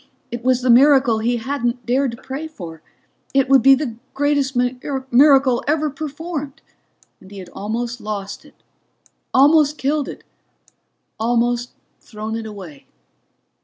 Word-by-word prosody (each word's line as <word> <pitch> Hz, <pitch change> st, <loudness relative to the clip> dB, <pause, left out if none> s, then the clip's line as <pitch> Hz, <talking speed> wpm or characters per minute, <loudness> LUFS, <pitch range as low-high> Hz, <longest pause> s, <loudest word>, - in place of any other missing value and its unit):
It 240 Hz, 0 st, -6 dB
was 255 Hz, 0 st, +1 dB
the 250 Hz, -, +4 dB
miracle 260 Hz, -2 st, +5 dB
he 240 Hz, +2 st, 0 dB
hadn't 240 Hz, 0 st, -3 dB
dared 250 Hz, -1 st, 0 dB
pray 275 Hz, +4 st, -5 dB
for. 170 Hz, -, -10 dB, 0.5 s
It 270 Hz, -1 st, +3 dB
would 270 Hz, -1 st, +6 dB
be 270 Hz, +1 st, +7 dB
the 260 Hz, -5 st, -4 dB, 0.2 s
greatest 285 Hz, -1 st, 0 dB
miracle 260 Hz, +1 st, +2 dB
ever 305 Hz, 0 st, +1 dB
performed, 300 Hz, 0 st, -6 dB, 0.6 s
and 190 Hz, -, -16 dB
he 200 Hz, -, -11 dB
had 185 Hz, -2 st, -9 dB
almost 230 Hz, +5 st, -4 dB
lost 205 Hz, -2 st, -6 dB
it, -, -, -20 dB, 0.8 s
almost 295 Hz, +2 st, +4 dB
killed 290 Hz, +1 st, -1 dB
it, -, -, -9 dB, 1.0 s
almost 240 Hz, +1 st, 0 dB, 0.3 s
thrown 215 Hz, 0 st, -7 dB
it 225 Hz, -1 st, -5 dB
away. 185 Hz, -9 st, -11 dB
255 Hz, 130 wpm, -20 LUFS, 230-280 Hz, 1.0 s, be